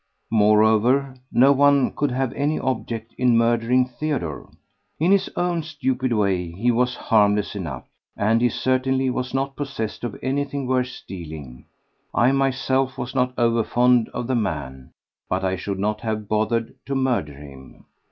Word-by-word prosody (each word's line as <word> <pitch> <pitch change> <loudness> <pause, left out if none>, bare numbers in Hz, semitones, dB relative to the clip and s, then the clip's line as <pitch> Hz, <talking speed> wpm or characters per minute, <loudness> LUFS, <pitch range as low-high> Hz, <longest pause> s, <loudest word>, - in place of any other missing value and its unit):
Moreover, 110 +5 +3 0.2
no 135 +3 +5
one 140 -1 +4
could 145 - 0
have 130 0 -1
any 145 +3 0
object 115 -3 -3
in 125 -2 +4
murdering 120 +2 +3
Theodore. 125 - -4 0.5
In 170 +5 +3
his 195 -1 +3
own 175 -1 0
stupid 130 -5 -2
way 95 -6 +1
he 115 +7 +1
was 125 +1 +1
harmless 105 -2 +2
enough, 80 -10 -5 0.3
and 110 +3 +2
he 120 - +4
certainly 130 +1 0
was 130 0 -3
not 135 0 -1
possessed 135 -8 -5
of 120 -4 -4
anything 140 +1 -2
worth 130 0 +1
stealing. 80 - -9 0.5
I 120 +2 +4
myself 135 0 0
was 125 -1 -5
not 125 -1 +1
over 115 -1 +2
fond 120 0 +3
of 125 - -4
the 130 - -1
man—but 80 - -4
I 95 0 0
should 95 +1 -4
not 105 +2 -1
have 110 -2 -3
bothered 110 +2 0
to 140 - -2
murder 125 - 0
him. 70 -2 -13
120 Hz, 150 wpm, -23 LUFS, 105-130 Hz, 0.5 s, no